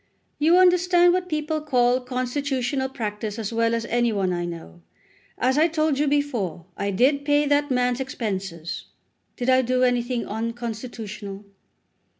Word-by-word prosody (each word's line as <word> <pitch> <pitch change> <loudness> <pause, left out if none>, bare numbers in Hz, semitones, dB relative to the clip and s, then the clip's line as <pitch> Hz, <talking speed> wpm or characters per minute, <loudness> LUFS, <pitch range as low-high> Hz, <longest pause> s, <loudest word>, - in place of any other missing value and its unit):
"You 325 +4 +5
understand 355 -1 +5
what 365 0 -1
people 305 0 -1
call 250 -4 +2
constitutional 260 +1 -2
practice 215 -3 -4
as 225 0 -4
well 230 0 +2
as 230 0 -2
any 240 0 +1
one 195 -3 0
I 175 0 -2
know. 165 - -8 0.6
As 260 +3 +2
I 320 - +5
told 310 -3 0
you 300 - +2
before, 240 - -1
I 200 - -2
did 265 +8 +2
pay 290 0 +3
that 290 0 +2
man's 250 -1 +1
expenses. 195 -10 -4 0.5
Did 245 - -3
I 260 0 +5
do 255 +1 +1
anything 245 -1 +1
unconstitutional?" 220 -3 -5
250 Hz, 150 wpm, -24 LUFS, 220-290 Hz, 0.6 s, You